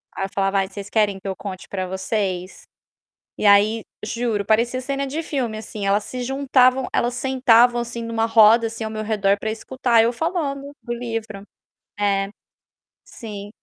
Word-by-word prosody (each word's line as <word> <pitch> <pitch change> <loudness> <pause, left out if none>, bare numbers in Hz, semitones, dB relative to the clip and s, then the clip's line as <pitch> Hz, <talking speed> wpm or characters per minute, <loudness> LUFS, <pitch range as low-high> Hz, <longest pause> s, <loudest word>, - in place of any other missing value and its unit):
Aí 195 - -2
eu - - -7
falava: 195 0 +1
"Ai, 190 - 0
vocês 200 +1 -8
querem 205 -3 +1
que 195 - -9
eu 190 - -2
conte 190 -2 -7
para 185 -2 -3
vocês?". 190 -1 -3 0.7
E - - -3
aí, 205 +2 +5 0.2
juro, 220 -3 -2
parecia 235 +4 +1
cena 275 +1 -2
de 315 +4 -3
filme, 245 -8 -2
assim, 215 -2 -6
elas 205 +1 +2
se 250 -1 -6
juntavam 260 -1 +2
elas 240 +1 +1
sentavam, 245 -2 +4
assim, 235 0 -5
em 230 - -5
uma 225 0 0
roda, 225 0 +6
assim, 225 0 -6
ao 220 - -4
meu 215 0 -4
redor 205 -2 +1
para 220 - -3
escutar 235 0 +1
eu 235 - +2
falando 285 -3 -2
do 240 - -4
livro. 225 -4 -5 0.6
É. 200 -1 +1 0.8
Sim. 205 -3 -8
225 Hz, 175 wpm, -22 LUFS, 200-245 Hz, 0.8 s, roda